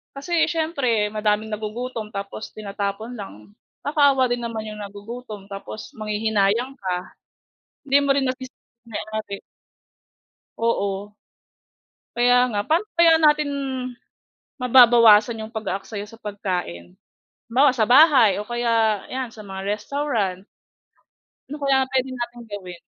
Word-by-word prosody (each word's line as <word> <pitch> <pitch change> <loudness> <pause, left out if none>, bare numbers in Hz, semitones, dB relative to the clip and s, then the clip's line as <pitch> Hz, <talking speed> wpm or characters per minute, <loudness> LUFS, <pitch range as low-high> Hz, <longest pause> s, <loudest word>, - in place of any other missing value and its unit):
Kasi 320 +3 +1
siyempre 280 -10 0
madaming 215 0 0
nagugutom 220 +2 -4
tapos 200 +2 -6
tinatapon 205 +2 -4
lang. 105 - -10 0.3
Nakakaawa 285 -3 +3
din 245 0 -1
naman 225 -2 -4
yung 210 0 -7
nagugutom 205 +1 -9
tapos 205 +2 -8
manghihinayang 215 +3 0
ka. 185 -2 -2 0.9
Hindi 275 0 +3
mo 280 - 0
rin 270 -1 +1
masisi 260 0 -5 0.3
yung - - -20
may-ari. 215 -1 -5 1.2
Oo. 205 -3 -1 1.0
Kaya 245 +1 +4
nga, 205 - -1
paano 325 - +1
kaya 330 -1 +6
natin, 300 -1 +4 1.1
mababawasan 235 -3 +6
yung 220 +1 -9
pag-aaksaya 205 -1 -4
sa 225 +2 -15
pagkain? 180 - -4 0.5
Halimbawa 265 +4 +4
sa 230 -4 +2
bahay 250 - +6
o - - -9
kaya 230 -3 +1
yan 260 -2 -3
sa 220 - -11
mga 190 -1 -6 0.2
restaurant. 220 -7 -2 1.1
Ano 295 - -5
kaya 265 -1 +3
pwede 265 0 0
nating 240 -1 -6
gawin? 180 -4 -7
225 Hz, 120 wpm, -23 LUFS, 205-255 Hz, 1.2 s, kaya